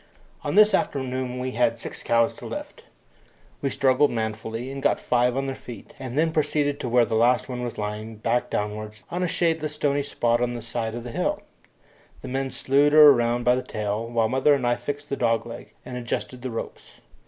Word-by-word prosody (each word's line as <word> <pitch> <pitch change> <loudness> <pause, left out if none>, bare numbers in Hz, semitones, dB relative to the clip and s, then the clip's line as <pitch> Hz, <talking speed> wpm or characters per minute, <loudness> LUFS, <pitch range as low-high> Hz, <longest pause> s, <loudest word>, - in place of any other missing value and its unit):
On - - -2
this 210 0 +7
afternoon 130 -5 -1
we 130 +1 -3
had 120 -1 +1
six 115 - -7
cows 115 0 +2
to - - -10
lift. - - -7 0.8
We 140 - 0
struggled 135 +2 +3
manfully, 110 +2 -4
and 135 0 -6
got - - +2
five 125 +1 +1
on 135 - 0
their 135 - -2
feet, 120 -6 -11
and 130 0 -6
then 160 +1 +3
proceeded 150 -2 0
to 125 - -3
where 120 0 +4
the - - -4
last 120 +3 +3
one 125 -2 -4
was 120 - -5
lying, 105 +1 -4
back 115 +3 0
downwards, 105 +1 -4
on 175 +1 -2
a 180 - +1
shadeless 160 -3 0
stony 145 -1 +1
spot 120 -4 0
on 120 0 0
the 120 - -6
side 115 -1 -3
of 120 0 -6
a 120 - -6
hill. - - -1 0.8
The - - -6
men 135 +1 -1
slewed 140 +3 +2
her 150 -2 +10
round 120 0 0
by 125 - +5
the 125 - 0
tail, 105 0 -3
while 115 -1 +1
mother 130 +4 +3
and 130 -3 -2
I 120 - +3
fixed 145 +2 -6
the 140 - -1
dog 115 -1 +1
leg 115 - -9
and 125 - -7
adjusted 125 +1 -4
the 130 - -4
ropes. 115 - -7
125 Hz, 210 wpm, -25 LUFS, 115-140 Hz, 0.8 s, her